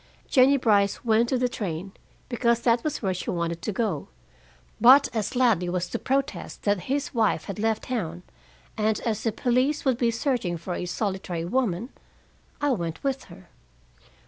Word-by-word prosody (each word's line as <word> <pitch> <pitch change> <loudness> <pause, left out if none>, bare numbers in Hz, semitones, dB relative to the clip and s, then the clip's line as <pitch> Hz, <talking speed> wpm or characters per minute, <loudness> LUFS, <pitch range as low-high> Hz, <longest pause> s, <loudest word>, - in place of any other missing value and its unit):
Jennie 270 +2 +5
Brice 205 -4 +2
went 230 +1 +3
to 260 - +1
the 250 0 +1
train, 195 -6 -4 0.4
because 235 -1 +1
that 235 -1 +2
was 305 -6 -3
where 190 -2 +1
she 180 - -5
wanted 170 -1 -2
to - - -2
go. 200 -8 -2 0.7
But 260 +5 +7
as 220 +2 -2
Ladley 225 -9 +3
was 180 0 -1
to - - -3
protest 270 +1 -2
that 205 -2 +2
his 280 +1 -1
wife 225 -4 +1
had 200 0 -6
left 220 0 0
town, 180 -8 -4 0.5
and 215 0 +1
as 220 -2 -1
the 225 - 0
police 255 +7 +1
would 260 -3 +2
be 235 - +3
searching 230 - -1
for 175 +2 -5
a 180 - -4
solitary 185 -3 -3
woman, 225 +1 -1 0.7
I 290 -1 +1
went 170 -8 -3
with 270 -1 -2
her. 90 - -15
225 Hz, 170 wpm, -26 LUFS, 185-255 Hz, 0.7 s, But